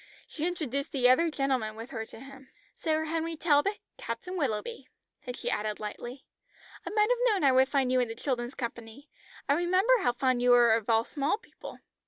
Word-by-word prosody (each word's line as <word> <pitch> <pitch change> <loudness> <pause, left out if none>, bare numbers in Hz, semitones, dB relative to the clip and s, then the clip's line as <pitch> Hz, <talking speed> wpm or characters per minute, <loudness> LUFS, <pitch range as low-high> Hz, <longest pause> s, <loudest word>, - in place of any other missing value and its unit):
She 320 +2 -3
introduced 285 -5 -3
the 255 -3 +3
other 295 +7 +4
gentlemen 265 -7 -1
with 225 +3 -9
her 225 -3 -5
to - - -12
him. 270 0 -13 0.3
"Sir 315 -1 0
Henry 325 +1 -2
Talbot. 320 +6 +2 0.2
Captain 230 +11 -5
Willoughby." 285 - -3 0.4
Then 250 -1 -5
she - - -3
added 210 0 -2
lightly 240 +5 -7 0.6
"I - - -5
might 425 +2 +2
have - - +2
known 410 -8 +2
I - - +6
would 260 +1 +4
find 270 -3 +1
you 255 - +3
in 245 - +1
the 225 - -6
children's 245 0 -3
company. 235 +3 -7 0.4
I 280 - +4
remember 370 +8 +3
how 245 - +1
fond 255 0 +1
you 245 - +3
were 240 -2 +6
of 225 0 -1
all 225 0 +4
small 285 - -1
people." - - -12
270 Hz, 200 wpm, -29 LUFS, 240-320 Hz, 0.6 s, I